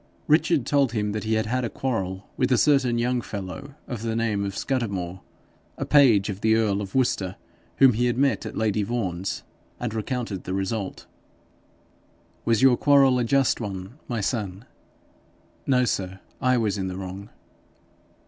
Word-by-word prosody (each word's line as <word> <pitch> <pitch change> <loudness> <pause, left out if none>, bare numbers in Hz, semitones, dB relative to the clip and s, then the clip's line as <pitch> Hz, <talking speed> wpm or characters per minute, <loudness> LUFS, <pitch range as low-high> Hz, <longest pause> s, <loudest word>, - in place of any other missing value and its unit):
Richard 155 -3 +3
told 140 -5 +2
him 105 -2 -1
that 105 +1 -4
he 110 0 +1
had 110 +1 +1
had 125 +4 -1
a 115 - -1
quarrel 95 -8 -3
with 130 0 0
a 125 - +5
certain 135 -3 +3
young 120 +1 +1
fellow 110 +8 -7
of 120 -4 -5
the 115 -1 -2
name 110 -3 0
of 100 -1 -4
Scudamore, 95 -9 -2 0.6
a - - -3
page 120 -9 +5
of 100 -1 -5
the 110 0 +4
earl 105 -3 +1
of 95 -2 -7
Worcester, 100 -8 +1 0.4
whom 135 -2 +7
he 120 +3 +1
had 120 - 0
met 135 -5 +2
at - - -6
lady 110 -1 +1
Vaughan's: 100 -4 -3 0.4
and 120 -3 -3
recounted 115 -3 -3
the 95 - -2
result. 95 +1 -3 1.4
'Was 115 0 +2
your 130 -2 +6
quarrel 135 -3 +5
a - - +1
just 135 +1 +2
one, 100 +5 -6
my 115 -3 -2
son?' 100 -1 -3 1.0
'No 125 -2 +3
sir. 95 -3 -2 0.2
I 130 0 +3
was 105 -3 0
in 95 - -2
the 90 0 -5
wrong.' 95 +2 -7
110 Hz, 170 wpm, -25 LUFS, 100-125 Hz, 1.4 s, whom